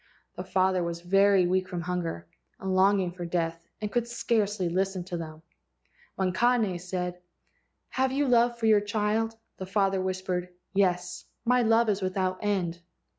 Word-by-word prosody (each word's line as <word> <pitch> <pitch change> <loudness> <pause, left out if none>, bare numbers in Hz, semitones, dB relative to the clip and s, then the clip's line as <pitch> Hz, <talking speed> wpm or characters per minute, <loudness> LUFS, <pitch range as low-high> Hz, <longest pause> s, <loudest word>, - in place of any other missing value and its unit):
The 180 - -5
father 185 0 +1
was 170 0 -4
very 195 +1 +4
weak 185 +1 +1
from 175 -1 -4
hunger, 170 - -3 0.3
and 190 - -3
long¬ 195 +2 +4
ing 180 -2 -1
for 175 0 -7
death, 170 -1 -2
and 210 -1 -4
could 240 -1 0
scarcely 210 -5 0
listen 190 +1 -1
to 180 0 -6
them. 160 -1 -8 0.7
When 185 -1 0
Kane 225 -3 +2
said, 180 0 -4 0.7
"Have 260 0 0
you 280 +1 +1
love 240 -1 +3
for 230 - -2
your 215 -2 +5
child?" 215 +2 0 0.2
the 190 - -6
father 195 -1 +1
whispered: 185 -1 -2 0.2
"Yes. 180 -2 0 0.2
1 250 +2 +3
My 250 - +4
love 225 +1 +4
is 205 -1 0
without 185 0 -1
end." 185 -5 -1
190 Hz, 170 wpm, -28 LUFS, 180-210 Hz, 0.7 s, your